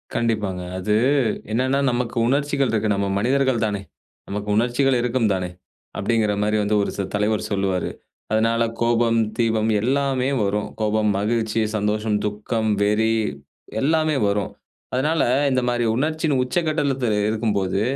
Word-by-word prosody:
கண்டிப்பாங்க. 105 -6 -1 0.2
அது 105 +3 0 0.6
என்னன்னா 130 +4 +1
நமக்கு 120 0 -2
உணர்ச்சிகள் 140 0 +1
இருக்கு. 110 -1 0
நம்ம 100 0 -1
மனிதர்கள் 130 +1 +1
தானே! 100 -2 -2 0.5
நமக்கு 105 +1 -4
உணர்ச்சிகள் 125 +3 +2
இருக்கும் 120 -2 +1
தானே! 90 -1 -2 0.5
அப்படிங்கிற 110 -3 +1
மாரி 105 +1 +1
வந்து 105 +1 +1
ஒரு - - -2
சில 100 - -2
தலைவர் 105 +1 0
சொல்லுவாரு. 95 -2 0 0.4
அதனால 115 +1 +2 0.2
கோபம், 115 0 +2 0.2
தீபம் 115 -2 +1
எல்லாமே 135 +1 +1
வரும். 105 +1 -1
கோபம், 110 0 +1
மகிழ்ச்சி, 110 +1 0
சந்தோஷம், 105 0 0
துக்கம், 110 +2 -2
வெறி 110 +2 +2 0.7
எல்லாமே 155 +1 +2
வரும். 100 -1 -1 0.4
அதனால, 150 +4 +1 0.3
இந்த 130 -1 +2
மாரி 120 0 0
உணர்ச்சியின் 155 +1 0
உச்சகட்டத்தில 140 -5 0
இருக்கும்போது, 105 -3 0
115 Hz, 125 wpm, -22 LUFS, 105-130 Hz, 0.7 s, உணர்ச்சிகள்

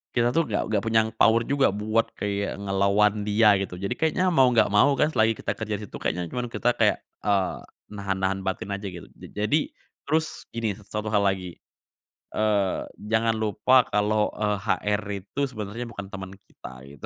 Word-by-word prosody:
kita 120 0 +2
tuh 165 - +4
nggak - - 0
nggak 105 -2 0
punya 110 -1 +2
power 115 +1 +4
juga 140 -3 +3
buat 110 +3 0
kayak 100 -1 -2
ngelawan 100 +1 +2
dia 105 0 +5
gitu. 95 -2 -4
Jadi 100 - -2
kayaknya 160 +4 +1
mau 135 -8 +4
nggak 115 -3 +4
mau 105 +8 +4
kan, 150 +1 +2
selagi 110 +1 +4
kita - - -2
kerja 110 -2 -3
di - - -9
situ, - - -12
kayaknya 90 0 -2
cuman 120 +5 -4
kita 120 +1 +1
kayak, 105 -3 +2 0.2
eee, 100 -3 +1 0.3
nahan-nahan 95 -1 -2
batin 95 +1 -3
aja 100 - -8
gitu. 85 -1 -10
Ja - - -12 0.2
jadi 150 +1 +1 0.3
terus 155 0 -1
gini, 115 -3 -2
1 105 +1 -6
hal 105 -1 +2
lagi, 95 -3 -1 0.7
eee, 105 -3 +1 0.2
jangan 110 +2 +1
lupa 110 +4 +3
kalau, 105 +1 +1
eee, 105 -1 0
HR 105 -1 0 0.2
itu 120 - -8
sebenarnya 115 +1 -6
bukan 100 -3 -7
teman 95 -1 -6
kita, 65 -9 -13
gitu. 70 -1 -11
105 Hz, 180 wpm, -25 LUFS, 100-115 Hz, 0.7 s, dia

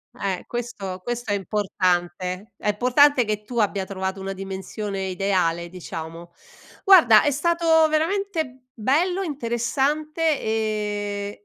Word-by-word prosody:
Eh, 190 -2 -3
questo 210 -6 -5
questo 240 -2 -3
è - - +2
importante, 185 0 -1
è - - -2
importante 250 +5 +4
che 210 0 -2
tu 235 +2 -4
abbia 200 -2 0
trovato 190 0 -4
una 195 0 -4
dimensione 195 +1 -5
ideale, 180 -3 0
diciamo. 170 -1 -8 0.5
Guarda 315 - +7
è 295 - +3
stato 325 +1 +3
veramente 320 -5 -1
bello, 330 - +1
interessante, 295 +3 -1
ehm, 210 -2 -2
215 Hz, 115 wpm, -23 LUFS, 190-285 Hz, 0.5 s, Guarda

